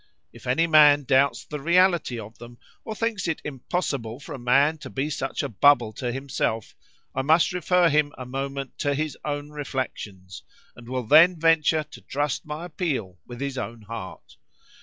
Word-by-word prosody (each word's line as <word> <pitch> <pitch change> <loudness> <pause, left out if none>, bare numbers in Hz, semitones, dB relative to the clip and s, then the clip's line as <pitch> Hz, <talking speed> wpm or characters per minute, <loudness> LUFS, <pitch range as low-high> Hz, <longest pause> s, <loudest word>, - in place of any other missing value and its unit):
If - - -13
any 130 +7 +2
man 150 -3 +6
doubts 130 -2 +2
the 150 - -6
reality 170 -6 +2
of 110 +1 -11
them, 120 0 -12 0.3
or 220 - -6
thinks 220 -4 -2
it 165 - -1
impossible 135 -4 -3
for 145 - -9
a 135 - -7
man 140 +6 +3
to - - -9
be 140 +3 -3
such 135 -2 -3
a - - -1
bubble 120 -1 +3
to 125 0 -3
himself,—I 130 -1 -4
must 160 +6 +3
refer 180 0 +3
him 150 -1 +2
a 130 - -7
moment 135 +1 -5
to 145 -1 0
his 155 -1 -2
own 145 0 -4
reflections, 110 - -6 0.3
and 120 -1 -13
will 130 -1 -2
then 160 +8 +6
venture 160 -1 +3
to 150 - -14
trust 145 +1 -3
my 155 +3 -5
appeal 135 - -3
with 120 -1 -9
his 140 -2 -3
own 115 -3 -6
heart. 110 -3 -9
140 Hz, 175 wpm, -25 LUFS, 125-155 Hz, 0.3 s, man